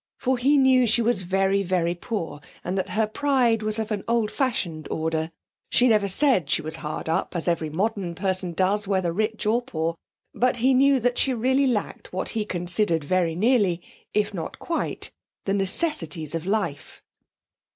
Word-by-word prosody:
For 260 -1 0
he 280 +4 +4
knew 260 -2 +5
she 230 +2 +3
was 230 -4 +1
very, 195 +2 +1
very 175 -2 0
poor, 175 -5 -5 0.2
and 180 - -2
that 190 0 -2
her 220 +1 +1
pride 240 -1 +1
was 215 0 -1
of 220 0 -3
an 205 -2 -2
old 230 -2 +1
fashioned 175 - -2
order 160 0 -1 0.4
she 250 - +4
never 210 -4 +3
said 195 - +2
she 160 - +2
was 160 +1 -4
hard 155 0 -5
up, 165 +3 -1
as 170 - -1
every 165 -2 0
modern 190 +1 -2
person 185 -1 -1
does, 195 +4 +1
whether 190 -4 0
rich 215 +3 -1
or 225 +3 +2
poor, 165 -9 -2 0.4
but 250 0 +1
he 255 +3 +3
knew 275 +1 +4
that 245 +1 0
she 265 -2 +2
really 260 +4 +2
lacked 225 -5 -3
what 185 - -3
he 220 -2 -2
considered 175 -2 0
very 170 +1 +1
nearly 205 -4 +2 0.3
if 210 -1 0
not 170 -4 -5
quite 335 - -2 0.3
the 195 - 0
necessities 185 - 0
of 165 +2 -4
life. 195 -9 -3
200 Hz, 180 wpm, -24 LUFS, 170-235 Hz, 0.4 s, knew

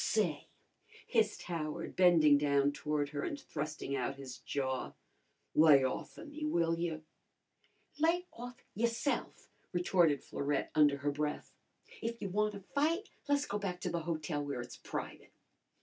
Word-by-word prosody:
"Say," 175 -10 +1 0.6
hissed - - +1
Howard, 165 -1 -4
bending 165 -6 +6
down 140 -1 +3
toward 150 0 -1
her 145 -1 -3
and 290 - -3
thrusting 150 - -4
out 135 +1 -1
his 135 -2 -8
jaw, 130 -2 -2 0.6
"lay 150 -3 +7
off 130 - -3
o' - - -8
me, 300 0 -7
will 170 - +1
yer?" 165 -2 -2 1.0
"Lay 335 +3 +3
off 245 +1 -9
yourse'f!" 235 +5 -1 0.2
retorted 175 -5 +3
Florette 140 0 -1
under 145 -2 +5
her 145 +1 0
breath. 150 +1 -3 0.5
"If 230 0 -3
you 200 - -3
wanna 210 +1 0
fight 325 +8 +1 0.2
le's 285 0 +3
go 205 - -2
back 185 -3 -3
to 180 - -2
the 170 - 0
hotel 155 -2 -2
where 140 -4 -3
it's 120 - -9
private." - - -6
165 Hz, 150 wpm, -34 LUFS, 145-210 Hz, 1.0 s, lay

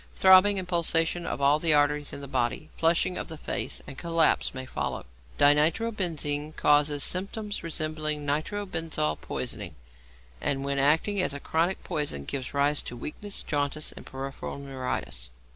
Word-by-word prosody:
Throbbing 190 +2 +7
and 185 -2 -3
pulsation 170 -1 +1
of - - -3
all 140 +2 +5
the 160 -1 +4
arteries 145 0 +2
in 140 - -7
the 140 - -7
body; 130 +3 -1
flushing 170 +2 +2
of - - -4
the 160 - -7
face - - -4
and 135 - -9
collapse 165 -2 +2
may 130 0 -6
follow. - - -4 0.3
=Dinitrobenzene= 155 -1 +2
causes 145 -1 +3
symptoms 205 +3 -1
resembling 155 -2 -1
nitro 155 +8 -1
benzol 160 - -1
poisoning, - - -5 0.7
and 135 -1 -1
when 140 0 0
acting 160 +8 +3
as 145 - -1
a - - -5
chronic 165 +6 0
poison 145 - -3
gives 130 - -4
rise 145 +1 +1
to 120 - -8
weakness, 200 +10 -6
jaundice, 145 0 -2
peripheral 135 +1 -6
neuritis. 130 - -4
150 Hz, 150 wpm, -27 LUFS, 140-170 Hz, 0.7 s, Throbbing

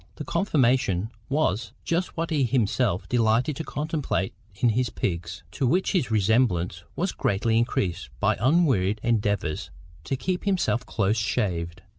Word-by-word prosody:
The - - -6
conformation 125 - +1 0.2
was 120 -6 0
just 170 +2 -1
what 165 0 -2
he 145 -3 +2
himself 120 -5 +1
delighted 120 +4 +2
to 160 - -3
contemplate 150 - -2 0.2
in 120 +4 +2
his 125 +2 +1
pigs, 85 -3 -3
to 130 - 0
which 180 +9 +2
his 175 - +1
resemblance 100 -5 +1
was 185 +2 0
greatly 110 +3 0
increased 95 - -1
by - - +2
unwearied 125 - +3
endeavours 105 -8 0 0.4
to 135 - -1
keep 180 +8 -2
himself 180 -11 +1
close 105 0 +1
shaved. 85 -5 -1
115 Hz, 140 wpm, -26 LUFS, 100-140 Hz, 0.4 s, unwearied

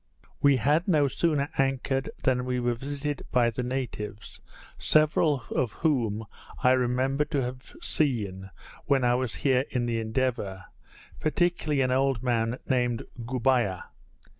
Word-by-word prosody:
We 140 -2 +5
had 150 +8 +2
no 150 -6 +4
sooner 145 0 0
anchored 135 0 0
than 125 -1 +2
we 125 0 -1
were 120 0 +1
visited 140 +3 -4
by 120 -2 +3
the 115 - -3
natives, 125 -5 -5 0.3
several 155 -3 +2
of 120 -5 0
whom 115 -9 0 0.4
I 125 - +6
remembered 130 +3 +1
to 140 -2 0
have 125 +1 -7
seen 100 -10 -1 0.4
when 135 -2 +2
I 120 0 +4
was 125 -2 -1
here 130 -1 +2
in 125 -2 -1
the 115 -1 -1
Endeavour, 110 -5 -2 0.5
particularly 155 -2 +1
an 130 -1 +1
old 135 -2 +1
man 120 -1 0
named 125 -3 +1 0.2
Goubiah. 120 -6 +1
130 Hz, 140 wpm, -27 LUFS, 120-140 Hz, 0.5 s, I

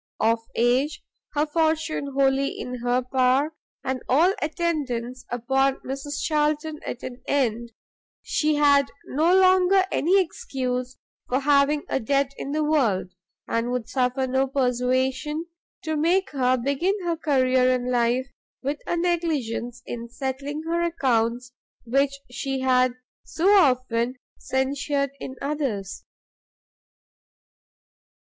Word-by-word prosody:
Of 225 +1 +3 0.2
age, 250 +5 +1 0.3
her 295 +1 +2
fortune 315 -2 0
wholly 275 0 +3
in 250 0 -5
her 245 +1 +1
power, 260 +4 +2 0.3
and 260 -1 -2
all 330 +9 +4
attendance 270 -7 -2
upon 265 +3 +1
Mrs 275 +2 -5
Charlton 305 0 0
at 245 - -6
an 250 0 -7
end, 235 -4 0 0.5
she 305 0 +1
had 285 -1 +4 0.2
no 325 +6 +2
longer 375 0 +5
any 370 +6 +3
excuse 255 - -3 0.3
for 260 +2 +1
having 290 +1 +3
a - - 0
debt 275 +3 0
in 275 - -5
the 305 +1 0
world, 235 -12 +1 0.3
and 230 +1 -1
would 245 -2 -2
suffer 255 +1 0
no 265 +1 +1
persuasion 260 +4 0 0.4
to 315 -1 -2
make 345 +5 +2
her 255 -2 +2
begin 280 +10 0
her 340 -1 +1
career 260 -5 +2
in 250 0 0
life, 245 +1 +2 0.4
with 285 +2 -2
a 345 - 0
negligence 290 -9 -1
in 235 0 -6
settling 275 +5 -4
her 335 +1 -1
accounts 245 -7 0 0.3
which 275 +3 +1
she 265 +2 -3
had 255 -1 +3 0.3
so 375 +5 +2
often 255 - +3 0.2
censured 280 +1 -1
in 260 - -7
others. 265 -10 -3
270 Hz, 125 wpm, -24 LUFS, 250-300 Hz, 0.5 s, longer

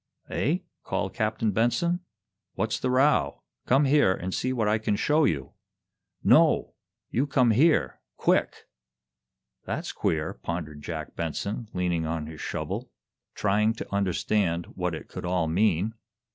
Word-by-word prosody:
"Eh?" 150 +8 +1 0.3
called - - -2
Captain 110 0 0
Benson. 145 - +1 0.6
"What's 110 0 -1
the 130 - -1
row? 135 +4 +2 0.2
Come 135 +3 +4
here 135 -9 +4
and 90 +1 -5
see 130 - -1
what 115 -5 0
I 110 +1 +2
can 105 -1 0
show 150 +8 +3
you!" 70 - -1 0.7
"No! - - +4 0.4
You 135 +5 +1
come 125 -5 +3
here 150 +8 +3 0.2
quick!" - - +1 1.0
"That's - - -3
queer," 80 0 -1
pondered 80 -3 -5
Jack 80 0 -6
Benson, 100 +8 -3
leaning 90 -3 0
on 80 -1 -2
his 80 0 -9
shovel, - - -4 0.5
trying 105 +2 +2
to 110 - -8
understand 95 -2 +1
what 90 -2 -2
it - - -9
could - - -7
all 90 -1 +1
mean. 100 +4 +2
105 Hz, 140 wpm, -27 LUFS, 85-120 Hz, 1.0 s, Come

